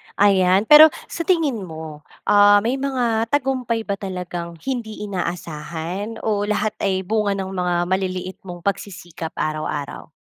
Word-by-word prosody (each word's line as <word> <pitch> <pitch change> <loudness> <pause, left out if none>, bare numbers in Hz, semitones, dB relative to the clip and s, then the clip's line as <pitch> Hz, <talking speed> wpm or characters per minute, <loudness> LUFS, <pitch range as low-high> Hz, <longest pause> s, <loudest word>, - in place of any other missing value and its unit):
ayan. 190 -1 +4
Pero 300 +6 +10 0.2
sa 335 -1 -4
tingin 315 - +2
mo, 160 -4 -9 0.2
ah, 205 0 +6
may 250 +4 0
mga 240 -5 0
tagumpay 255 -4 0
ba 200 -2 -3
talagang 180 -3 -5
hindi 235 -5 -4
inaasahan 175 +2 -5
o 205 -2 0
lahat 210 0 0
ay 190 -1 0
bunga 205 0 0
ng 190 -1 -4
mga 180 -2 -1
maliliit 185 0 -2
mong 175 -1 -8
pagsisikap 175 -4 -4
araw-araw? 155 -2 -3
200 Hz, 135 wpm, -21 LUFS, 175-225 Hz, 0.2 s, Pero